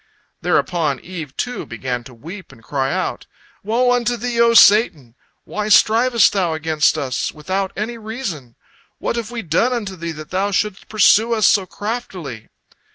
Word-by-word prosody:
Thereupon 160 -7 0
Eve, 160 -6 -8
too, 245 0 -3
began 125 -2 -4
to 130 - -12
weep 170 - -10
and 120 -4 -18
cry 135 -2 -1
out: - - -3 0.4
"Woe 240 +4 +2
unto 245 0 +1
thee, 235 0 -1
O 235 0 +4
Satan! 200 - +5 0.3
Why 210 0 -4
strivest 230 +3 +4
thou 180 -5 0
against 155 -1 +1
us 130 -2 -2
without 190 +5 -3
any 230 +3 -4
reason? 210 - -6 0.4
What - - -2
have 230 -2 -4
we 235 -2 -5
done 180 +10 +1
unto 205 -6 -4
thee 170 -1 -5
that 155 -1 -10
thou 190 +2 0
shouldst 205 0 -2
pursue 220 +2 +4
us 215 -3 +2
so 195 -1 +3
craftily?" 185 - -6
195 Hz, 160 wpm, -19 LUFS, 155-230 Hz, 0.4 s, Satan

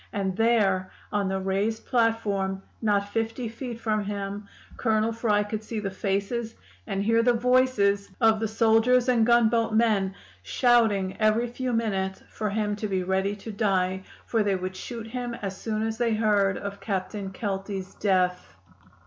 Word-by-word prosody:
And 195 -2 -2
there, 205 -4 +2 0.2
on 200 -2 0
the 190 0 -1
raised 195 +4 -1
platform, 205 -5 0 0.2
not 205 -2 +1
fifty 225 +3 -2
feet 230 +1 -6
from 215 -2 0
him, 200 0 -4 0.3
Colonel 220 -1 +1
Fry 215 -2 +1
could 215 +1 -5
see 220 0 -4
the 195 -2 -3
faces 200 +4 -2 0.3
and 195 -2 -1
hear 230 +2 +3
the 245 +1 +3
voices 235 -5 +2
of 225 -1 +4
the 220 - 0
soldiers 225 +3 +3
and 235 -3 +3
gunboat 230 -1 +3
men, 205 -4 +2 0.3
shouting 210 - +2
every 215 +2 +3
few 250 +1 -3
minutes 195 -5 -1
for 215 -1 -3
him 210 0 -1
to 215 - -3
be 190 -2 -1
ready 190 +2 0
to 210 +2 -8
die, 190 -3 0 0.2
for 225 - +1
they 200 -2 +1
would 185 0 -4
shoot 230 +3 -6
him 240 +1 -4
as 195 -3 -5
soon 215 +2 -3
as 225 0 -3
they 230 -2 +2
heard 205 -3 +2
of 200 0 -6
Captain 195 0 -3
Kelty's 195 -1 -4
death. 180 - 0
215 Hz, 165 wpm, -26 LUFS, 195-230 Hz, 0.3 s, of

